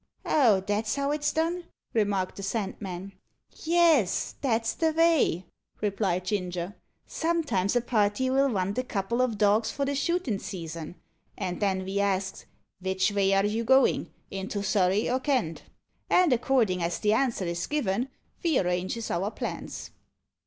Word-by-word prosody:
"Oh! 230 -10 +4
that's 205 +3 -1
how 280 0 0
it's 295 0 0
done?" 340 +2 -1 0.3
remarked 200 -4 0
the - - -5
Sandman. 195 -2 -4 0.5
"Yes, 325 - +3
that's 225 -4 +1
the 320 -1 +1
vay," 320 - +3 0.3
replied 195 -3 0
Ginger. 180 -2 -2 0.3
"Sometimes 315 - 0
a 245 - +4
party'll 255 +5 +2
vant 200 0 -1
a - - 0
couple 235 +1 -1
o' 255 - +4
dogs 215 -1 +2
for 280 - -2
the 280 - -1
shootin' 280 - 0
season; 165 -4 -6 0.4
and 180 -1 -3
then 190 -2 0
ve 195 +1 -1
asks, 195 -1 -1 0.3
'Vich 190 +2 +1
vay 200 -1 +2
are 195 +1 +3
you 215 +2 0
a - - -5
goin' 265 +2 +4 0.2
into 195 +1 -3
Surrey 195 0 +2
or 255 +1 +1
Kent?' 255 - -1 0.4
And 360 -6 +5
accordin' 230 -7 +2
as 170 0 -1
the 210 0 +2
answer 230 -5 +1
is 170 0 -2
given 255 -4 0 0.3
ve 330 -6 +2
arranges 180 +5 -1
our 190 +4 0
plans." - - -6
210 Hz, 150 wpm, -27 LUFS, 190-265 Hz, 0.5 s, And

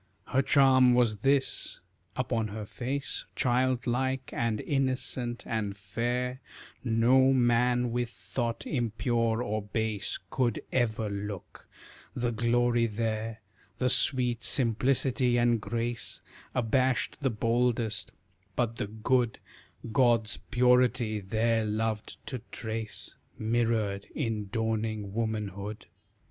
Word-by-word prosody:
Her 135 - +3
charm 130 -3 +5
was 120 -4 +3
this 135 +4 +1 0.4
upon 115 -1 0
her 105 0 -6
face 135 +6 -3
Childlike 130 +1 +1
and 115 -2 0
innocent 130 -3 -1
and 105 -3 -2
fair, 120 +6 -2 0.4
No 125 +3 +4
man 125 -1 +3
with 120 0 -1
thought 120 -1 -4
impure 115 -2 0
or 110 -1 -1
base 105 0 -2
Could 125 -4 +1
ever 110 -3 +1
look; 100 -1 -6 0.5
the 120 -1 0
glory 120 +1 +2
there, 110 0 -2 0.4
The 125 - +1
sweet 125 -2 +1
simplicity 125 +1 +2
and 120 -2 +3
grace, 120 +2 -3 0.3
Abashed 130 +1 +1
the 135 - +2
boldest; 115 -1 0 0.4
but 115 -2 0
the 120 - -2
good 115 +2 +1 0.5
God's 115 -4 +3
purity 125 -2 +3
there 110 +3 +1
loved 110 0 -2
to 130 -5 -5
trace, 110 -1 -5 0.2
Mirrored 110 -3 0
in 110 -8 -2
dawning 110 -3 -1
womanhood. 105 -2 -3
115 Hz, 105 wpm, -29 LUFS, 110-125 Hz, 0.5 s, charm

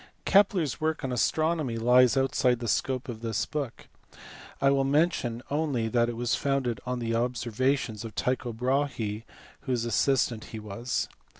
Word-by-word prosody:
Kepler 195 -3 +4
s 145 -1 -4
work 160 0 -1
on 130 - -2
astronomy 155 +1 0
lies 125 +2 +5
outside 130 -2 +2
the 120 0 -5
scope 130 +4 0
of 115 -3 -6
this 115 -3 -1
book. 145 -5 -5 0.7
I 135 - +4
will 135 -1 +2
mention 135 -5 +1
only 140 -7 0
that 120 0 +2
it 120 - -5
was 120 0 0
founded 135 -4 0
on 125 0 -1
the 115 -1 -2
ob 120 +2 0
servations 120 0 -1
of 115 -2 -8
Tycho 125 -1 -1
Brahe 120 -3 -1
f - - -21 0.3
whose 120 -3 0
assistant 120 -1 +1
he 110 - -8
was. 110 +4 -3
125 Hz, 170 wpm, -28 LUFS, 115-140 Hz, 0.7 s, lies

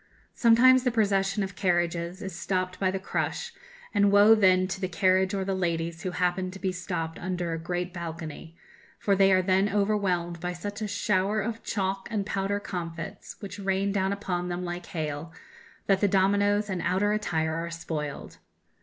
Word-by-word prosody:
Sometimes 255 +2 +6
the 250 - +3
procession 200 -3 +1
of 190 -1 -6
carriages 175 0 0
is 190 -2 -5
stopped 185 +2 -2
by 190 - +2
the 190 - -1
crush, 190 - -3 0.4
and 205 -1 +4
woe 205 +2 +7
then 185 -3 +4
to 190 +1 -5
the 185 - 0
carriage 185 +1 +2
or 190 -1 -1
the 195 - -1
ladies 170 -2 -2
who 185 - -2
happen 180 +1 0
to 190 - -9
be 190 -1 -1
stopped 175 -3 -4
under 180 -2 -2
a 165 - -3
great 175 +1 -3
balcony, 165 -2 -7 0.4
for 200 - +1
they 195 0 +5
are 185 0 +4
then 190 +2 +2
overwhelmed 195 -5 0
by 180 +1 -3
such 205 +4 -6
a 215 - -1
shower 200 0 +1
of 225 +2 -3
chalk 195 -1 -2
and 210 -4 -1
powder 200 0 -1
comfits, 175 0 -6
which 200 -1 -7
rain 195 0 0
down 195 -1 0
upon 180 -3 -2
them 175 +1 -3
like 175 0 -5
hail, 155 -1 -4 0.5
that 195 -1 +2
the 205 - +4
dominoes 205 +2 +2
and 185 -3 -2
outer 205 +3 +1
attire 160 -7 -1
are 165 +1 -3
spoiled! 155 -3 -5
190 Hz, 180 wpm, -27 LUFS, 175-200 Hz, 0.5 s, woe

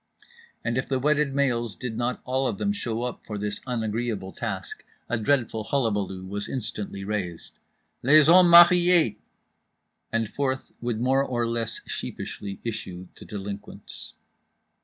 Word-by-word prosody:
And 115 +2 0
if 130 - -4
the 135 - +1
wedded 145 0 +1
males 120 -6 +1
did 115 +4 -5
not 120 +2 -2
all 130 +1 0
of - - -2
them 205 0 0
show 120 - -3
up 125 -1 -4
for 105 - -6
this 105 0 -3
unagreeable 110 -4 -2
task, 100 -6 -5 0.2
a 120 - 0
dreadful 115 -2 0
hullabaloo 100 -7 -1
was 100 +2 -4
instantly 105 -5 -3
raised— 95 -5 -4 0.4
"LES 150 +4 +6
HOMMES 175 +2 +7
MARIÉS!" 175 - +7 0.9
and 115 -1 0
forth 130 +3 -2
would 120 -2 -2
more 135 +3 +3
or 120 -3 -1
less 115 -1 -2
sheepishly 100 -1 -6
issue 95 -5 -5
the - - -12
delinquents. 100 0 -8
115 Hz, 140 wpm, -26 LUFS, 105-135 Hz, 0.9 s, HOMMES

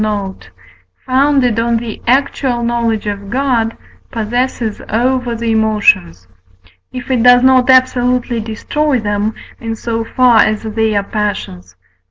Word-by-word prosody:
note), 200 - -4 0.6
founded 260 -3 +2
on 235 0 +1
the 230 -2 -6
actual 260 -1 0
knowledge 235 -2 -1
of 200 -1 -5
God, 245 -3 0 0.3
possesses 235 0 -2
over 245 +1 0
the 230 0 -2
emotions: 205 - +1 0.6
if 250 +1 -6
it 250 -3 +1
does 245 +1 +6
not 260 -1 +4
absolutely 250 -2 +2
destroy 260 +6 -1
them, 210 0 -2 0.2
in 225 -1 -4
so 225 0 -3
far 245 0 +3
as 215 0 +2
they 220 0 -1
are 200 - +1
passions 195 - -4
(V. 90 - -42
230 Hz, 135 wpm, -15 LUFS, 215-250 Hz, 0.6 s, does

